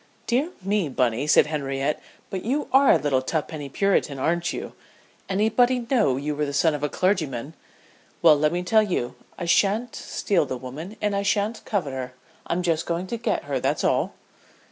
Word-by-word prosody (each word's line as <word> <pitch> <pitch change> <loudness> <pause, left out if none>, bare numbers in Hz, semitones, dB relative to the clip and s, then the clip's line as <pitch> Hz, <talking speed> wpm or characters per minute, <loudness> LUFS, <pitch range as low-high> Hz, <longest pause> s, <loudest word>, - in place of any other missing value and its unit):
"Dear 260 +7 +1
me, 195 -4 0
Bunny," 125 +1 0
said 150 - +6
Henriette, 140 -1 -2 0.3
"but 190 -1 -3
you 275 +6 -1
are 270 +1 +6
a - - +6
little 140 -3 +1
tuppenny 150 0 -3
Puritan, 170 -3 +1
aren't 170 +5 0
you? - - -6 0.6
Anybody'd 235 +5 +2
know 210 - +3
you 145 +2 -2
were 150 0 -1
the 140 - -4
son 155 +3 +3
of 150 - -4
a 150 - 0
clergyman! 155 - -1 0.7
Well, 160 -3 +8
let 150 +1 +2
me 175 +1 -2
tell 220 +4 +4
you, 180 - -1 0.2
I 175 - -4
sha'n't 210 +7 +2
steal 175 -7 0
the 130 - -3
woman, 150 - -8
and 210 -1 +1
I 200 - +1
sha'n't 205 +3 0
covet 170 -10 -1
her. 130 -1 -5 0.3
I'm 175 +1 -1
just 165 -2 0
going 170 +2 -1
to 235 +5 -4
get 230 - -1
her, - - -2
that's - - 0
all." - - +1
170 Hz, 190 wpm, -24 LUFS, 145-205 Hz, 0.7 s, Well